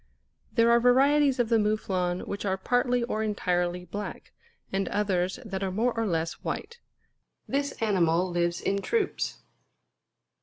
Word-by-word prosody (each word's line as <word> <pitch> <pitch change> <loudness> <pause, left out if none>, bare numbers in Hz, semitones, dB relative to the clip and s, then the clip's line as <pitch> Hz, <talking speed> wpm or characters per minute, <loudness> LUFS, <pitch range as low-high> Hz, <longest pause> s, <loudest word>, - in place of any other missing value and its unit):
There 230 -1 +4
are 235 - +6
varieties 270 +3 +4
of 240 -3 +1
the 230 -2 +4
Mouflon 190 -4 0
which 200 - -5
are 190 -2 0
partly 245 +4 +1
or 220 -2 -2
entirely 180 -4 -1
black; 205 +4 -7 0.4
and 195 -1 0
others 190 -2 0
that 195 -3 -4
are 195 - -1
more 225 +6 0
or 225 -1 0
less 165 -2 -2
white. 470 +3 -5 0.7
This 280 +1 -1
animal 185 -5 +2
lives 175 0 0
in 200 0 0
troops. 445 - -1
205 Hz, 145 wpm, -27 LUFS, 180-245 Hz, 0.7 s, are